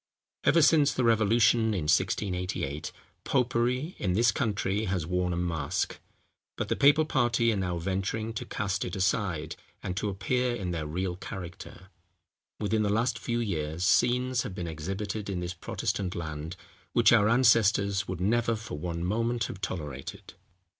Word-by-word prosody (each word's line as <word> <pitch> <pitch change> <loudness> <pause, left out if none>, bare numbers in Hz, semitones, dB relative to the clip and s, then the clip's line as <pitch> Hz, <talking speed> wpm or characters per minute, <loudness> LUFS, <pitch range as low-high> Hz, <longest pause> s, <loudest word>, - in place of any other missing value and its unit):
Ever 165 +1 +5
since 145 -2 +5
the 130 - -1
revolution 110 0 +3
in 90 - -1
1688, 85 -2 -1 0.3
popery, 125 +5 0
in 90 -3 0
this 115 +4 +4
country, 105 -3 -1
has 95 -5 -1
worn 90 +1 0
a 85 - -2
mask; 80 -5 -2 0.6
but - - -3
the - - +1
papal 145 +3 +5
party 120 -5 +2
are - - -1
now 90 -3 -1
venturing 95 +5 -2
to 110 - -4
cast 100 -1 -2
it - - -4
aside, 90 -4 -1 0.3
and 90 - -3
to 105 - -1
appear 125 +5 0
in 95 -6 -3
their 80 -3 -3
real 90 +3 -2
character. 90 0 -9 0.7
Within 110 +1 +1
the 105 - +1
last 115 +4 +1
few 120 -1 -2
years 80 -6 -2
scenes 125 +5 +3
have 95 - -6
been 90 - -4
exhibited 95 +6 -4
in 95 -3 -2
this 90 0 -4
Protestant 90 +2 -3
land, 80 0 -5 0.4
which 115 -1 +5
our 105 -2 +5
ancestors 110 -5 +3
would 95 -2 -4
never 115 +4 +1
for 110 -8 -7
one 85 0 -3
moment 115 +4 0
have 100 - -6
tolerated. 75 -7 -6
100 Hz, 160 wpm, -28 LUFS, 90-115 Hz, 0.7 s, Ever